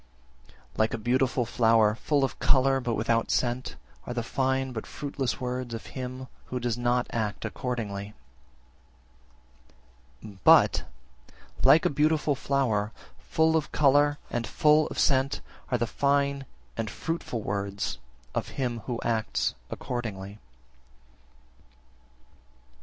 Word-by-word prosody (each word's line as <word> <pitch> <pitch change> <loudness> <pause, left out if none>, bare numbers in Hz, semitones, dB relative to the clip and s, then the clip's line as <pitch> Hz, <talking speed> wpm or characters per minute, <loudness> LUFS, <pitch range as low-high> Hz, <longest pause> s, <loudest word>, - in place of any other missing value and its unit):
Like 110 +1 +2
a - - -4
beautiful 125 +2 +1
flower, 115 -2 +4
full 140 +5 0
of 135 - -2
colour, 135 0 +4
but 120 -3 -1
without 115 +1 +1
scent, 125 +1 -1 0.3
are 120 - -4
the 120 - -1
fine 130 +2 0
but 110 - -5
fruitless 140 -3 -3
words 125 -2 -3
of 115 - -8
him 130 0 -5 0.2
who 125 - -4
does 120 -2 -1
not 120 0 +1
act 110 -3 -2
accordingly. 105 -5 -4 2.1
52. 100 -3 -11
But, - - +6 0.8
like 160 - +6
a - - +4
beautiful 150 +1 +2
flower, 125 -7 0 0.3
full 160 0 +2
of 155 -2 0
colour 145 0 +4
and 120 -1 -2
full 150 0 +4
of - - -8
scent, 135 0 +2 0.3
are 125 - +2
the 120 - 0
fine 140 +1 +1 0.3
and 115 -2 -2
fruitful 160 -8 -4
words 100 0 -3 0.3
of - - -2
him 125 -4 -1
who 120 -3 -2
acts 115 -2 0 0.2
accordingly. 105 -4 -5
125 Hz, 125 wpm, -27 LUFS, 115-135 Hz, 2.1 s, But